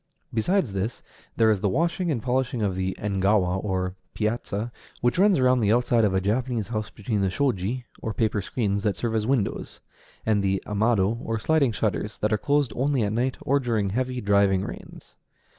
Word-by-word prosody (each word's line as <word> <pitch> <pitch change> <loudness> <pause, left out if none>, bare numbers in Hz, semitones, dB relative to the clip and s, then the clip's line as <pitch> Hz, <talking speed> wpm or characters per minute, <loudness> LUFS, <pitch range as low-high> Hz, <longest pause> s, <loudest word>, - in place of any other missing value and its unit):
Besides 125 - +1
this, 100 +5 -3 0.3
there 110 -1 +5
is 105 - +1
the 100 - +2
washing 170 - 0
and 125 -8 -1
polishing 125 -2 0
of 95 -3 0
the 95 0 -2
engawa, 95 -2 +1
or 95 -2 -1 0.2
piazza, 110 0 -2 0.3
which 120 +7 +1
runs 200 -2 +5
around 130 -1 +4
the 105 -2 +2
outside 120 0 +3
of 100 -3 +2
a - - +3
Japanese 110 +2 -1
house 110 -2 -3
between 105 -1 -2
the 95 - +2
shoji, 120 +1 -1 0.2
or 110 - -2
paper 110 -2 0
screens 100 -1 -1
that 100 -1 0
serve 115 -2 -2
as 110 -1 0
windows, 125 -7 -1 0.5
and 105 -2 +2
the 95 0 +1
amado, 105 0 +1
or 115 0 -2
sliding 140 +2 +2
shutters, 105 0 -2
that 105 +1 0
are 105 - +1
closed 145 -4 +1
only 135 -1 +1
at 105 0 -1
night, 125 +3 0
or 140 +2 +2
during 115 -6 0
heavy, 125 +4 -1
driving 100 -2 +3
rains. - - -10
110 Hz, 190 wpm, -25 LUFS, 100-125 Hz, 0.5 s, there